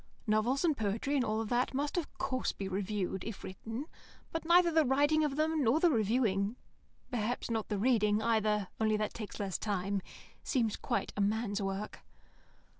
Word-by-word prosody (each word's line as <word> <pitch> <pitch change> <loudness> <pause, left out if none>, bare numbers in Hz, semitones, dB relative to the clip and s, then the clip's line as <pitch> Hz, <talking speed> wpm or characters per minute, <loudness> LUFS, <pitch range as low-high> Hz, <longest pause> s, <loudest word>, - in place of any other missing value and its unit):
Novels 230 +8 +2
and 315 -3 +3
poetry 220 +5 -1
and 270 - +3
all 220 0 -1
that 245 +3 +1 0.3
of 345 -4 -3
course 255 -1 -2
must - - -1
be 195 - -3
reviewed, 190 -1 -2
if 220 -2 -6
written; 225 +8 -6 0.5
but 325 - -3
neither 345 +1 +6
the 320 -1 +4
writing 290 +3 +3
of 290 -2 0
them 310 0 +1
nor 250 +6 +4
the 345 0 +4
reviewing 215 -3 +1 0.6
(perhaps 240 0 -2
not 225 -2 -1
the 210 - 0
reading 210 -2 +3
either, 215 -3 +1
only 215 -1 +2
that 215 0 -2
takes 215 -3 -7
less 195 -3 -2
time) 200 -1 -1 0.4
seems 230 -7 0
quite 200 - -2
a 205 - 0
man's 205 0 0
work. 195 +2 -3
220 Hz, 175 wpm, -32 LUFS, 205-265 Hz, 0.6 s, neither